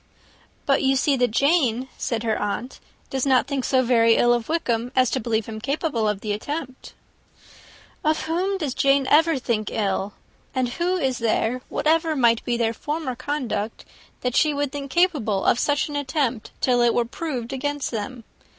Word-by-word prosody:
"But 275 - +3
you 270 0 +3
see 275 +1 +2
that 245 -1 +2
Jane," 265 -1 +2
said 230 -2 -2
her 220 -2 +1
aunt, 210 +5 -4 0.3
"does 265 -2 -1
not 260 -3 +3
think 275 -1 -2
so 255 0 +2
ill 235 0 +4
of 240 +1 -2
Wickham, 245 -7 -1
as 255 -2 +3
to 265 - 0
believe 225 -2 -1
him 220 -1 -7
capable 275 -3 -1
of 205 -1 -3
the 210 - -3
attempt." 260 +5 -5 1.1
"Of 310 0 +1
whom 370 +5 -1
does 300 -8 -2
Jane 275 0 +3
ever 320 0 +5
think 230 -4 -1
ill? 200 -1 -1 0.4
And 255 -1 +1
who 350 +8 -1
is 265 -7 -1
there, 230 +2 0
whatever 320 0 +1
might 235 -4 +3
be 240 -1 -1
their 230 -1 +1
former 295 0 -4
conduct, 245 -5 -3 0.4
that 250 -1 -1
she 305 -2 +3
would 285 -1 -1
believe 280 -1 -6
capable 275 - +1
of 240 - +3
such 290 0 +1
an 295 - -6
attempt, 265 -5 -1
till 245 -2 +3
it 240 -1 +3
were 240 - +2
proved 250 -2 -5
against 290 +1 -2
them? 235 +2 -5
255 Hz, 180 wpm, -23 LUFS, 230-290 Hz, 1.1 s, ever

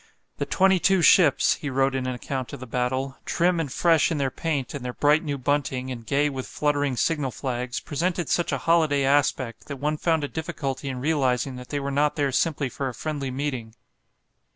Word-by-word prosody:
"The - - -1
twenty 190 -1 +3
two 190 -1 +3
ships," 165 -7 +5
he 145 - -4
wrote 135 0 +1
in 130 -1 -2
an 130 - -2
account 130 +1 -5
of - - -6
the 130 - -7
battle, 130 +2 -2
"trim 175 0 +1
and 150 -5 -2
fresh 165 +1 +3
in 165 - -1
their 135 -2 0
paint 145 -5 -2
and 140 -3 -5
their 125 0 -4
bright 150 +2 +3
new 145 -3 -2
bunting, 130 -1 -1
and 120 -2 -6
gay 145 +4 +1
with 135 -3 -4
fluttering 145 -3 0
signal 150 -2 0
flags, 125 0 -3
presented 170 +2 -2
such 175 - 0
a 140 - 0
holiday 145 0 +2
aspect, 130 -5 +1
that 140 - -5
one 150 +3 -1
found 160 -1 +1
a - - -1
difficulty 140 -3 -4
in 130 -1 -4
realizing 135 -3 +1
that 125 0 -10
they 145 - -2
were 140 0 -3
not 145 +2 +1
there 140 -2 0
simply 150 +1 0
for 135 +1 -3
a 125 - -8
friendly 145 -4 -3
meeting." 130 -4 -4
140 Hz, 210 wpm, -25 LUFS, 130-150 Hz, -, ships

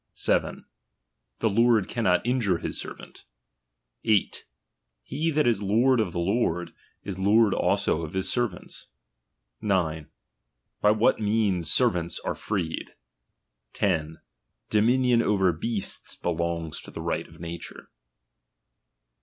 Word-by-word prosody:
7. - - 0 0.8
The 110 - +3
lord 115 -2 +3
cannot 110 -7 +1
injure 120 -8 +1
his 85 - -4
servant - - -10 0.8
8. 110 -4 +1 0.6
Ke 155 +4 -1
that 150 - +3
is 115 -4 +2
lord 115 +6 +3
of 105 -5 0
the 85 - -6
lord, 90 -2 0 0.3
is 95 -2 -5
lord 105 +2 +4
also 80 - +1
of 80 -2 -6
his 95 0 -1
servants. 120 -8 -3 0.7
9. 85 -7 0 0.7
By 105 - +5
vhat 110 +2 +3
means 105 -6 +1
servants 90 -9 +1
are - - -2
freed. 90 -7 -4 0.8
10. 80 -5 -1 0.5
Dominion 120 +3 +3
over 95 -5 +2
beasts 100 +5 -3
belongs 85 -1 -3
to - - -12
the - - -8
right - - -2
of - - -17
nature. 85 0 -8
100 Hz, 120 wpm, -26 LUFS, 85-115 Hz, 0.8 s, By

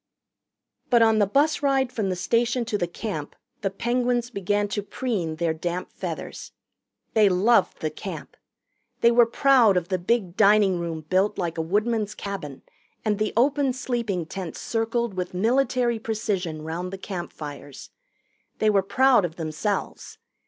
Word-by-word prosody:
But 235 -2 +5
on 220 -1 +4
the 205 - +3
bus 290 +8 +2
ride 270 -3 +2
from 210 -6 -2
the 185 - -1
station 235 +6 +1
to 220 - -3
the 175 -4 0
Camp 170 -4 -5 0.3
the 195 - 0
Penguins 240 +3 -1
began 205 0 0
to 205 +1 -2
preen 200 -6 -3
their 165 0 0
damp 175 +3 -4
feathers. - - -6 0.6
They 215 -3 +5
loved 205 +6 +3
the - - -1
Camp. - - -8 0.7
They 235 - +6
were 235 -1 +5
proud 240 -5 +4
of 175 -1 -2
the 185 -1 0
big 185 -1 0
dining 200 -3 +4
room 165 -2 -4
built 185 +6 +1
like 170 -3 -2
a - - +2
woodman's 210 +5 0
cabin 190 -9 -6 0.4
and 210 -1 +1
the 215 0 0
open 275 +1 +3
sleeping 235 -9 -2
tents 180 0 -6
circled 230 0 -1
with 180 -1 -4
military 240 +2 +1
precision 195 -8 -3
round 170 +3 -4
the 195 - -5
campfires. 155 -7 -8 0.7
They 215 -1 +3
were 200 -2 +4
proud 250 +3 +4
of 165 -2 -3
themselves. 160 +5 -3
205 Hz, 155 wpm, -25 LUFS, 180-235 Hz, 0.7 s, They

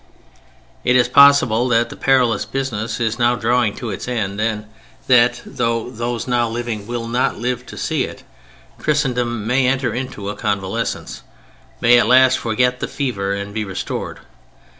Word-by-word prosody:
It 125 - +3
is 125 -1 +4
possible 125 -3 +5
that 115 -1 +1
the - - -8
perilous 125 -5 +2
business 115 -5 -3
is 115 +1 -1
now 120 +1 +3
drawing 120 -2 +1
to 120 -3 -5
its 95 - -6
end, 105 -4 -2
and 110 -1 -1 0.4
that 120 -1 +4
(though 115 +1 -2
those 120 0 -4
now 120 -2 +1
living 115 -3 -4
will 120 -1 -4
not 120 +2 0
live 125 +2 -3
to - - -10
see - - -1
it) - - -10 0.6
Christendom 125 -7 -1
may 125 +3 +2
enter 130 -3 0
into 120 -5 -5
a 105 - -4
convalescence: 100 -4 -3 0.6
may 120 +1 +6
at - - +2
last 130 0 +5
forget 125 +2 0
the - - -3
fever 100 -8 -2
and 100 0 -6
be 110 0 -2
restored. 95 -2 -5
120 Hz, 160 wpm, -19 LUFS, 110-125 Hz, 0.6 s, may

